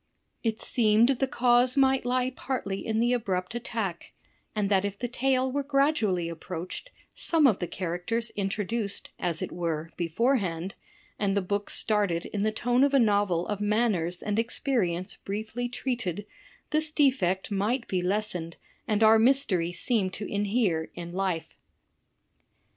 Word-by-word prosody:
It 225 Hz, -2 st, -1 dB
seemed 225 Hz, 0 st, +3 dB
the 270 Hz, 0 st, +1 dB
cause 245 Hz, +1 st, +3 dB
might 265 Hz, -2 st, +3 dB
lie 255 Hz, +1 st, +1 dB
partly 200 Hz, -7 st, -3 dB
in 220 Hz, 0 st, -1 dB
the 240 Hz, +2 st, +3 dB
abrupt 190 Hz, -5 st, -1 dB
attack; 225 Hz, -7 st, -4 dB, 0.4 s
and 210 Hz, -2 st, +1 dB
that 195 Hz, -1 st, +3 dB
if 200 Hz, -1 st, -3 dB
the 245 Hz, -, -3 dB
tale 260 Hz, +1 st, +1 dB
were 285 Hz, +2 st, 0 dB
gradually 275 Hz, -, +1 dB
approached, 170 Hz, -, -6 dB, 0.2 s
some 325 Hz, -3 st, +3 dB
of 225 Hz, -8 st, +4 dB
the 175 Hz, -, -2 dB
characters 185 Hz, +7 st, -2 dB
introduced 205 Hz, +1 st, -2 dB
(as 170 Hz, -2 st, -1 dB
it -, -, -5 dB
were) 165 Hz, -2 st, -3 dB
beforehand, 185 Hz, -, 0 dB, 0.5 s
and 200 Hz, -1 st, +1 dB
the -, -, +3 dB
book 200 Hz, +2 st, -2 dB
started 200 Hz, -6 st, 0 dB
in 205 Hz, -, -3 dB
the 215 Hz, +1 st, +2 dB
tone 245 Hz, +4 st, +2 dB
of 280 Hz, 0 st, +3 dB
a -, -, +6 dB
novel 205 Hz, -6 st, +2 dB
of 205 Hz, -1 st, -3 dB
manners 205 Hz, -5 st, 0 dB
and 210 Hz, +1 st, 0 dB
experience 220 Hz, -7 st, -1 dB
briefly 220 Hz, +4 st, -4 dB
treated, 240 Hz, -7 st, -3 dB, 0.5 s
this 310 Hz, 0 st, +2 dB
defect 235 Hz, -, +1 dB
might 220 Hz, +5 st, 0 dB
be 185 Hz, -2 st, 0 dB
lessened 180 Hz, -3 st, -2 dB, 0.3 s
and 215 Hz, 0 st, +2 dB
our 220 Hz, 0 st, +7 dB
mystery 225 Hz, -9 st, +2 dB
seem 205 Hz, 0 st, +1 dB
to 200 Hz, +3 st, -5 dB
inhere 200 Hz, -5 st, 0 dB
in 175 Hz, 0 st, -7 dB
life." 185 Hz, -3 st, -2 dB
210 Hz, 150 wpm, -27 LUFS, 185-245 Hz, 0.5 s, our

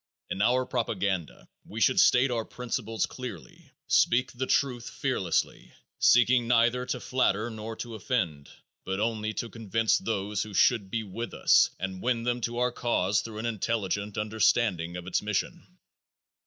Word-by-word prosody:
In 95 Hz, -, -2 dB
our 125 Hz, +4 st, +3 dB
propaganda 100 Hz, -8 st, -2 dB, 0.2 s
we -, -, -8 dB
should -, -, +3 dB
state 125 Hz, +1 st, +5 dB
our 115 Hz, -2 st, -1 dB
principles 115 Hz, -2 st, -3 dB
clearly, 125 Hz, -2 st, -9 dB, 0.2 s
speak 130 Hz, +2 st, +3 dB
the 130 Hz, +1 st, -4 dB
truth 125 Hz, -4 st, 0 dB
fearlessly, -, -, -2 dB, 0.3 s
seeking 120 Hz, 0 st, +5 dB
neither 120 Hz, +1 st, +2 dB
to -, -, -2 dB
flatter 120 Hz, -3 st, 0 dB
nor 110 Hz, 0 st, -6 dB
to 120 Hz, +1 st, -7 dB
offend, 90 Hz, -, -2 dB, 0.3 s
but 95 Hz, +1 st, -3 dB
only 110 Hz, -1 st, -1 dB
to 120 Hz, -, -3 dB
convince 115 Hz, 0 st, 0 dB
those 105 Hz, -2 st, -2 dB
who 105 Hz, -2 st, -6 dB
should 105 Hz, -4 st, +3 dB
be 115 Hz, +2 st, -2 dB
with 115 Hz, +4 st, -6 dB
us -, -, +5 dB
and 95 Hz, +1 st, -4 dB
win 120 Hz, -1 st, 0 dB
them 120 Hz, 0 st, -1 dB
to 120 Hz, +1 st, -3 dB
our 125 Hz, 0 st, +1 dB
cause 105 Hz, -5 st, 0 dB
through 110 Hz, -2 st, -8 dB
an 110 Hz, -, -4 dB
intelligent 105 Hz, -2 st, -2 dB
understanding 105 Hz, -5 st, +1 dB
of 90 Hz, -, -8 dB
its 90 Hz, -, 0 dB
mission. 105 Hz, -2 st, -3 dB
115 Hz, 155 wpm, -28 LUFS, 100-120 Hz, 0.3 s, state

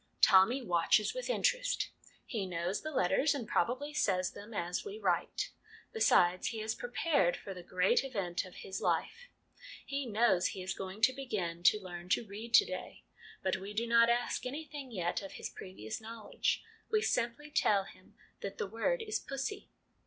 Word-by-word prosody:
Tommy 230 Hz, +8 st, +6 dB
watches 180 Hz, +2 st, +3 dB
with -, -, -4 dB
interest: -, -, +1 dB, 0.3 s
he 210 Hz, -7 st, -3 dB
knows 175 Hz, +2 st, -2 dB
the 310 Hz, -, -4 dB
letters, 280 Hz, -, +2 dB
and 240 Hz, -6 st, -4 dB
prob -, -, +2 dB
ably 285 Hz, +4 st, -4 dB
says 185 Hz, -10 st, +1 dB
them 210 Hz, +3 st, -11 dB
as 180 Hz, -4 st, -2 dB
we 415 Hz, 0 st, -6 dB
write. -, -, 0 dB, 0.4 s
Besides, 180 Hz, -, +4 dB
he 225 Hz, -, -3 dB
is 220 Hz, +1 st, -1 dB
prepared 245 Hz, -, +1 dB
for 195 Hz, -, -7 dB
the 180 Hz, -, -8 dB
great 180 Hz, +6 st, +2 dB
event 200 Hz, -10 st, -2 dB
of 185 Hz, -2 st, -12 dB
his 190 Hz, -, -5 dB
life; 485 Hz, +2 st, -1 dB, 0.6 s
he 275 Hz, -1 st, -3 dB
knows 210 Hz, -5 st, +3 dB
he 190 Hz, -, -5 dB
is 185 Hz, -, -2 dB
going 190 Hz, +2 st, -7 dB
to 260 Hz, +3 st, +6 dB
begin 200 Hz, -11 st, -3 dB
to 210 Hz, +4 st, +5 dB
learn 175 Hz, -2 st, -8 dB
to 205 Hz, -, +2 dB
read 215 Hz, +3 st, -8 dB
to 410 Hz, -, +8 dB
day. -, -, -7 dB, 0.4 s
But 190 Hz, 0 st, +1 dB
we 195 Hz, +2 st, -8 dB
do 230 Hz, +2 st, +1 dB
not 235 Hz, 0 st, +5 dB
ask 240 Hz, +1 st, +1 dB
anything 285 Hz, +1 st, -6 dB
yet 180 Hz, -6 st, -1 dB
of 195 Hz, -, -8 dB
his -, -, -6 dB
previous 185 Hz, -, -7 dB
knowledge. 225 Hz, 0 st, -2 dB, 0.3 s
We 430 Hz, -1 st, +2 dB
simply 250 Hz, +5 st, -1 dB
tell 200 Hz, -8 st, +3 dB
him 185 Hz, -, -16 dB, 0.2 s
that 200 Hz, -, -6 dB
the -, -, -1 dB
word 230 Hz, -, -1 dB
is 430 Hz, -1 st, -1 dB
'pussy.' 275 Hz, +9 st, -5 dB
220 Hz, 180 wpm, -33 LUFS, 185-275 Hz, 0.6 s, to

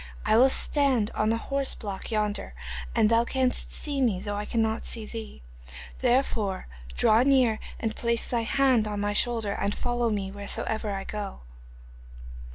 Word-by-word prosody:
I -, -, +3 dB
will 255 Hz, +4 st, +6 dB
stand 265 Hz, -6 st, +2 dB
on 215 Hz, -, 0 dB
the 225 Hz, -, +2 dB
horse 275 Hz, +3 st, 0 dB
block 200 Hz, -4 st, -5 dB
yonder 210 Hz, -, -2 dB, 0.4 s
and -, -, +4 dB
thou 230 Hz, +1 st, +3 dB
canst 255 Hz, +1 st, +1 dB
see 285 Hz, -2 st, -2 dB
me 220 Hz, -8 st, +2 dB
though 205 Hz, +1 st, -4 dB
I 205 Hz, +1 st, -3 dB
cannot 225 Hz, 0 st, 0 dB
see 225 Hz, -2 st, -3 dB
thee. 220 Hz, -, -8 dB, 0.6 s
Therefore 240 Hz, -6 st, 0 dB, 0.3 s
draw 215 Hz, -, +4 dB
near 255 Hz, -5 st, +3 dB, 0.2 s
and 220 Hz, -1 st, -2 dB
place 235 Hz, -1 st, -1 dB
thy 240 Hz, -2 st, 0 dB
hand 250 Hz, -2 st, +2 dB
on 205 Hz, -1 st, -3 dB
my 205 Hz, 0 st, -1 dB
shoulder 225 Hz, -1 st, +1 dB
and 200 Hz, +1 st, -2 dB
follow 240 Hz, -1 st, -1 dB
me 200 Hz, -3 st, -2 dB
wheresoever 205 Hz, +2 st, -1 dB
I 195 Hz, -1 st, -3 dB
go. 205 Hz, -, -6 dB
225 Hz, 165 wpm, -27 LUFS, 205-245 Hz, 0.6 s, will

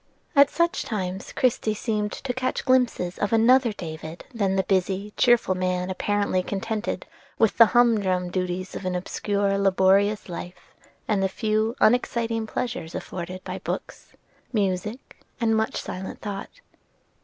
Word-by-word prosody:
At 280 Hz, 0 st, +7 dB
such 340 Hz, +3 st, +1 dB
times 190 Hz, -4 st, -4 dB
Christie 225 Hz, -4 st, +1 dB
seemed 210 Hz, -1 st, -1 dB
to 260 Hz, -2 st, -4 dB
catch 255 Hz, +1 st, -2 dB
glimpses 245 Hz, -9 st, +2 dB
of 205 Hz, -, 0 dB
another 235 Hz, +2 st, +5 dB
David 160 Hz, -3 st, -7 dB
than 200 Hz, -4 st, 0 dB
the 190 Hz, -, +2 dB
busy, 195 Hz, +2 st, 0 dB
cheerful 240 Hz, -6 st, +4 dB
man 185 Hz, 0 st, -1 dB
apparently 200 Hz, -1 st, 0 dB
contented 215 Hz, +4 st, -3 dB, 0.3 s
with 225 Hz, -, +2 dB
the 230 Hz, -, +10 dB
humdrum 205 Hz, -7 st, +2 dB
duties 185 Hz, 0 st, -2 dB
of -, -, -6 dB
an 185 Hz, -1 st, -1 dB
obscure, 200 Hz, +2 st, -1 dB
laborious 195 Hz, +2 st, +3 dB
life, 175 Hz, 0 st, -8 dB, 0.3 s
and 205 Hz, -3 st, +1 dB
the 190 Hz, -, +2 dB
few 220 Hz, +2 st, 0 dB
unexciting 230 Hz, -1 st, +2 dB
pleasures 195 Hz, -9 st, -4 dB
afforded 185 Hz, +1 st, -6 dB
by -, -, -5 dB
books, -, -, -6 dB, 0.4 s
music, 210 Hz, +2 st, -2 dB, 0.2 s
and 225 Hz, -2 st, +2 dB
much 220 Hz, 0 st, 0 dB
silent 190 Hz, +1 st, -6 dB
thought. 205 Hz, -, -7 dB
205 Hz, 140 wpm, -25 LUFS, 185-225 Hz, 0.4 s, the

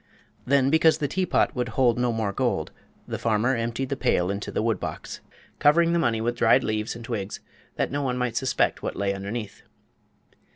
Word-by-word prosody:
Then, 135 Hz, 0 st, +3 dB
because 160 Hz, 0 st, +5 dB
the 150 Hz, -3 st, -1 dB
teapot 185 Hz, 0 st, +1 dB
would 125 Hz, -2 st, -1 dB
hold 125 Hz, -3 st, +3 dB
no 125 Hz, -1 st, +1 dB
more 110 Hz, -3 st, -2 dB
gold, -, -, -1 dB, 0.4 s
the -, -, -4 dB
farmer 115 Hz, +4 st, +1 dB
emptied 115 Hz, +3 st, -2 dB
the 140 Hz, -, -1 dB
pail 100 Hz, -9 st, +1 dB
into 100 Hz, 0 st, -4 dB
the -, -, -1 dB
wood 110 Hz, -5 st, 0 dB
box, -, -, -6 dB, 0.4 s
covering 165 Hz, +3 st, +4 dB
the 170 Hz, -, +2 dB
money 115 Hz, -8 st, +1 dB
with 120 Hz, +1 st, -1 dB
dried -, -, +4 dB
leaves 110 Hz, +1 st, -2 dB
and 115 Hz, -1 st, -9 dB
twigs, 105 Hz, -5 st, -4 dB, 0.4 s
that -, -, -1 dB
no 145 Hz, +1 st, -1 dB
one 125 Hz, -3 st, -1 dB
might 125 Hz, -2 st, -1 dB
suspect 130 Hz, +1 st, +1 dB
what -, -, -4 dB
lay 100 Hz, 0 st, 0 dB
underneath. 100 Hz, +2 st, -6 dB
120 Hz, 195 wpm, -25 LUFS, 110-135 Hz, 0.4 s, because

